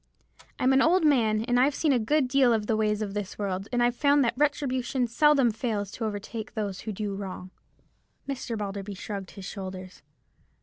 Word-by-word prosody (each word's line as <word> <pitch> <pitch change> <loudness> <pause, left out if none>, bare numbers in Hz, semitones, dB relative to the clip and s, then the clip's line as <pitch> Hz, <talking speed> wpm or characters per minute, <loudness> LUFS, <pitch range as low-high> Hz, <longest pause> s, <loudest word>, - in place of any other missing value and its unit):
I'm 260 +1 +3
an 265 - +5
old 340 +2 +4
man, 225 -7 +3
and 245 +1 +1
I've 275 +3 +3
seen 305 -4 +2
a 250 - +3
good 275 +5 +1
deal 255 -2 +4
of 215 -2 0
the 220 - +1
ways 215 0 0
of 200 -2 -5
this 205 -2 -5
world, 195 -1 -3
and 245 -1 +2
I've 240 0 +2
found 285 +1 +4
that 235 -1 +1
retribution 265 -3 0
seldom 270 +1 +4
fails 210 -3 -3
to 230 - -4
overtake 215 +1 -5
those 205 -3 -3
who 220 - -5
do 205 0 -3
wrong." 190 -2 -7 0.8
Mr. 260 -4 -4
Balderby 200 -1 -5
shrugged 195 0 -6
his 195 - -10
shoulders. 185 -2 -7
225 Hz, 190 wpm, -27 LUFS, 205-260 Hz, 0.8 s, an